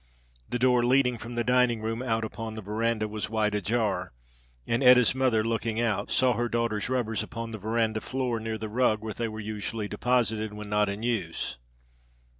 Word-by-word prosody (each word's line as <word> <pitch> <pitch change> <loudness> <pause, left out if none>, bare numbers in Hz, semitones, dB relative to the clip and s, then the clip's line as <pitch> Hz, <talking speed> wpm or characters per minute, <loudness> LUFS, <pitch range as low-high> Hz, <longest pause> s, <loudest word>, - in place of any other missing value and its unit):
The - - -1
door 125 -1 +3
leading 125 -1 +3
from 120 +2 -7
the 120 - 0
dining 125 -1 +3
room 115 +2 -3
out 115 -3 0
upon 110 0 -5
the 110 - -7
veranda 110 +2 0
was 105 0 -4
wide 110 -1 +1
ajar, 100 - -1 0.5
and 115 +3 0
Etta's 125 -1 +7
mother, 130 -4 +2
looking 115 0 -1
out, 115 -4 0
saw 125 -1 +3
her 120 +1 -1
daughter's 115 -2 -1
rubbers 120 -4 0
upon 115 0 -6
the 110 - -6
veranda 110 +1 0
floor 125 -2 -2
near 110 0 -3
the 110 0 -5
rug 110 -1 +1
where 110 -1 -4
they 115 - -2
were 110 0 -6
usually 105 0 -4
deposited 110 -1 0
when 105 0 -7
not 105 0 +2
in 100 +3 -5
use. 100 - -2
115 Hz, 190 wpm, -28 LUFS, 110-120 Hz, 0.5 s, Etta's